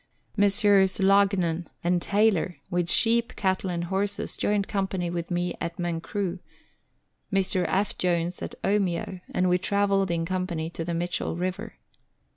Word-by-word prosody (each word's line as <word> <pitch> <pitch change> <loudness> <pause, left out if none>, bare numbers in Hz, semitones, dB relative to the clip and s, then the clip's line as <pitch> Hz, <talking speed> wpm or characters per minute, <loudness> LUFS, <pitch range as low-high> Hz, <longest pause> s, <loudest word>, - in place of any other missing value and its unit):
Messrs. 200 -2 +4
Loughnan 190 -4 +3 0.2
and 175 0 +2
Taylor, 200 -4 +2 0.2
with 175 -1 0
sheep, 235 +2 +2
cattle, 190 -1 0
and 170 -1 -2
horses, 195 +3 -2
joined 205 -1 0
company 190 -3 -2
with 170 -1 -4
me 175 -1 -1
at 170 0 -4
Mancroo; 175 +2 -3 0.9
Mr. 190 -2 +2
F. 200 +1 0
Jones 175 0 0
at - - -5
Omeo; 190 -2 0
and 180 0 +1
we 180 0 +3
travelled 195 0 +1
in 165 -1 0
company 175 -3 -2
to 165 - -4
the 170 0 -3
Mitchell 175 0 -2
River. 180 +1 -4
185 Hz, 140 wpm, -26 LUFS, 175-195 Hz, 0.9 s, Messrs